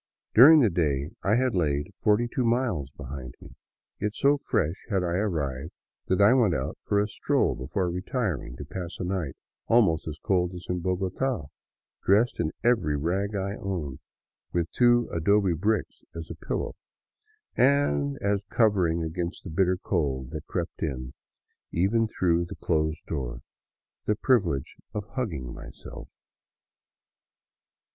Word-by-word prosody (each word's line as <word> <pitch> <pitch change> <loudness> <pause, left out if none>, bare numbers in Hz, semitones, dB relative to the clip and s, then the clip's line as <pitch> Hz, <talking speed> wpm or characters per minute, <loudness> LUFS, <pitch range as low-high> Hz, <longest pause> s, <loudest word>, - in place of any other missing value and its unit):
During 150 +7 +9
the 115 -6 +4
day 75 -3 0
I 100 +3 +2
had 130 0 +2
laid 75 -5 0
forty 105 +3 +3
two 125 +2 -1
miles 115 - 0
behind 65 -2 -8
me, - - -12 0.5
yet 105 +1 -2
so 140 +1 +3
fresh 85 - -1
had 95 -4 +1
I 85 -1 -1
arrived 80 -6 -2 0.3
that 95 - +1
I 100 +4 +7
went 115 -10 +3
out - - -3
for 100 - +2
a 105 - +2
stroll 105 - +1
before 70 +9 -2
retiring 90 - -2
to 75 - -7
pass 90 +4 -6
a - - -4
night 90 -7 -2 0.3
almost 95 -10 +3
as 75 -2 -5
cold 90 +2 0
as 90 - -8
in 90 0 -1
Bogota, 95 - -1 0.5
dressed 110 +5 +3
in 80 - 0
every 115 -11 +2
rag 95 +7 -1
I 100 +1 -2
owned, 85 -9 -4 0.5
with 85 -1 -1
two 120 -1 +4
adobe 95 +3 +3
bricks 105 +5 -1
as 80 -1 -6 0.2
pillow, - - -2 0.8
and 120 - +2
as 100 0 +1
covering 90 -7 +2
against 85 +2 -4
the 90 - -7
bitter 90 +2 +2
cold 70 -9 -1
that 80 -2 -6
crept - - -4
in 65 -4 -3 0.6
even 105 +6 +2
through 85 -5 +1
the 95 +4 -8
closed 80 -1 -1
door 60 -5 -4 0.3
— - - -53
the 105 - +3
privilege 95 - +1 0.2
of 105 - -2
hugging 80 - -4
myself. - - -10
90 Hz, 150 wpm, -27 LUFS, 75-105 Hz, 0.8 s, During